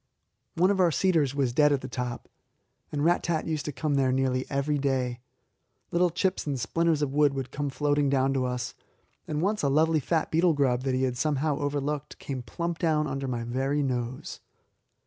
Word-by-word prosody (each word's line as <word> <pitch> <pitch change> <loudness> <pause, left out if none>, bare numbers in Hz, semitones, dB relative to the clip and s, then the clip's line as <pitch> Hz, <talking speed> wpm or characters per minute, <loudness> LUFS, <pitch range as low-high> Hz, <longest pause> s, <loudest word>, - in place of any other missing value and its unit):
One 185 +4 +4
of 195 - 0
our 180 -2 +5
cedars 160 -5 +2
was 135 -4 0
dead 150 +2 +4
at 140 -2 +1
the 130 - -6
top, 125 -2 -4 0.6
and 145 0 -1
Rat 175 +1 +3
tat 165 -2 -1
used 155 -3 -2
to 150 - -2
come 145 +3 -2
there 135 -2 +2
nearly 130 0 0
every 140 +1 0
day. 130 -3 -1 0.7
Little 175 +1 +3
chips 185 0 -1
and 140 -3 -1
splinters 165 +2 +1
of 135 -2 -2
wood 145 -1 +3
would 130 -2 -4
come 145 0 -2
floating 145 0 +1
down 135 0 +2
to 130 -1 0
us, 125 -1 -3 0.5
and 150 +1 -2
once 210 +2 +1
a 140 - +2
lovely 155 +3 +3
fat 160 +3 -1
beetle 165 +1 +4
grub 130 -4 +1
that 130 -1 +1
he 130 - 0
had 125 -2 -1
somehow 150 +1 0
overlooked 145 0 -2
came 135 -2 -5
plump 170 +6 -4
down 155 -2 +2
under 135 -1 -3
my 120 -2 -2
very 135 +5 0
nose. 125 -1 -3
145 Hz, 200 wpm, -27 LUFS, 130-155 Hz, 0.7 s, our